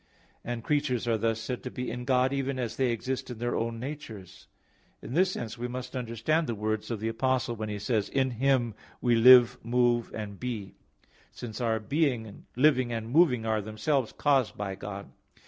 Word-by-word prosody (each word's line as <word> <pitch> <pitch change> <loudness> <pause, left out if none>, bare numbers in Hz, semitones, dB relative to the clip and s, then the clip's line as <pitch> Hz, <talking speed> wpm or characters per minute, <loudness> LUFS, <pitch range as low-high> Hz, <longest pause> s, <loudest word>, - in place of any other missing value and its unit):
And 120 -1 -4
creatures 140 -5 0
are 115 -2 +1
thus 115 +1 0
said 120 +2 -4
to 125 - -5
be 125 0 -4
in 125 0 -5
God, 130 0 +2
even 135 -1 -1
as 120 -3 -3
they 130 -2 +1
exist 125 +3 -3
in 120 - -6
their 120 +2 -2
own 115 0 -2
natures. 115 - -8 0.5
In 120 - -8
this 185 +4 +3
sense 115 - -5
we 120 - -2
must 125 +2 -6
understand 125 +7 0
the 115 - -2
words 110 0 -2
of 115 -3 -3
the 110 - -2
Apostle 125 +1 0
when 110 -1 -4
he 105 - -3
says, 105 0 -1
"In 130 -1 +1
Him 125 -1 +1 0.3
we 120 - +2
live, 120 +1 +7
move, 120 0 +1
and 105 -2 -6
be"; 115 -6 -4 0.6
since 120 0 -7
our 115 -2 +1
being, 120 -3 -1
living, 130 -2 +3
and 115 0 -4
moving 130 -7 +4
are 110 -1 +1
themselves 110 +5 -1
caused 135 -6 +1
by 100 -1 -3
God. 100 +1 -7
120 Hz, 190 wpm, -28 LUFS, 110-130 Hz, 0.6 s, live